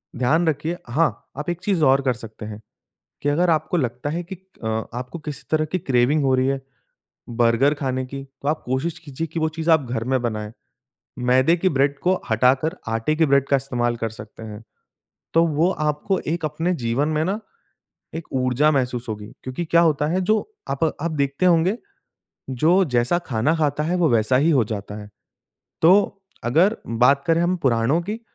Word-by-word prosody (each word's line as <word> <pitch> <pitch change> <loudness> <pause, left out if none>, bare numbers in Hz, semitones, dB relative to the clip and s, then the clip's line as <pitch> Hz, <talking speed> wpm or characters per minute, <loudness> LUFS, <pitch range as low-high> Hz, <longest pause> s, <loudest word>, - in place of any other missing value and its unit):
ध्यान 150 +8 +2
रखिए। 160 +3 -1
हाँ, 155 +6 0
आप 150 +3 -4
एक 175 0 -3
चीज़ 190 -6 0
और 135 0 +4
कर 130 -2 +1
सकते 110 -2 -9
हैं। 105 0 -8 0.6
कि 145 - +1
अगर 170 +5 +2
आपको 165 +2 +1
लगता 125 -1 -2
है 170 +4 -3
कि 180 +3 -8
अ, 190 -10 -11 0.3
आपको 125 +7 -6
किसी 150 -2 -7
तरह 155 0 +2
कि 155 +4 -2
क्रेविंग 135 +1 +2
हो 135 -1 +2
रही 130 0 +1
है, 135 0 -1 0.7
बर्गर 120 +4 +2
खाने 130 -3 -2
की 135 +1 -7 0.2
तो 140 - -1
आप 155 +1 -1
कोशिश 135 +6 -2
कीजिए 155 0 -5
कि 165 +2 -4
वो 160 - +2
चीज़ 160 +1 -2
आप 160 -5 +4
घर 115 -2 -2
में 130 - +2
बनाएँ। 110 -3 -3 0.7
मैदे 130 +6 +3
की 185 +2 +2
ब्रेड 140 -1 +1
को 185 +1 +1
हटाकर, 130 +7 +2
आटे 115 +7 0
के 160 +1 +3
ब्रेड 140 -1 +3
का 140 - +3
इस्तेमाल 120 -3 -1
कर 115 -1 -2
सकते 105 0 -11
हैं। 105 0 -9 0.7
तो 165 +1 +5
वो 160 +3 +2
आपको 155 +5 -1
एक 165 0 -2
अपने 160 +4 -1
जीवन 120 +6 0
में 155 0 0
ना 195 +5 -1 0.8
एक 165 0 -5
ऊर्जा 130 +3 +2
महसूस 125 -3 -1
होगी। 105 0 -6
क्योंकि 130 +7 -4
क्या 170 +1 +4
होता 150 -3 +2
है 175 +5 0
जो 215 +4 +2 0.3
अप 140 +3 0 0.2
आप 170 - -1
देखते 140 +3 0
होंगे, 175 +4 +3 0.7
जो 165 +9 +3
जैसा 125 +3 +1
खाना 125 +6 +1
खाता 150 -2 0
है 175 +3 0
वो 175 -3 +3
वैसा 115 +1 +3
ही 150 +6 +3
हो 135 -7 +3
जाता 105 -1 -6
है। 105 - -10 0.7
तो 195 +3 +4 0.2
अगर 170 - +3
बात 125 +5 +3
करें 165 0 +3
हम 180 +1 +1
पुराणों 125 +5 +2
की 210 +6 -5
145 Hz, 195 wpm, -22 LUFS, 125-165 Hz, 0.8 s, तो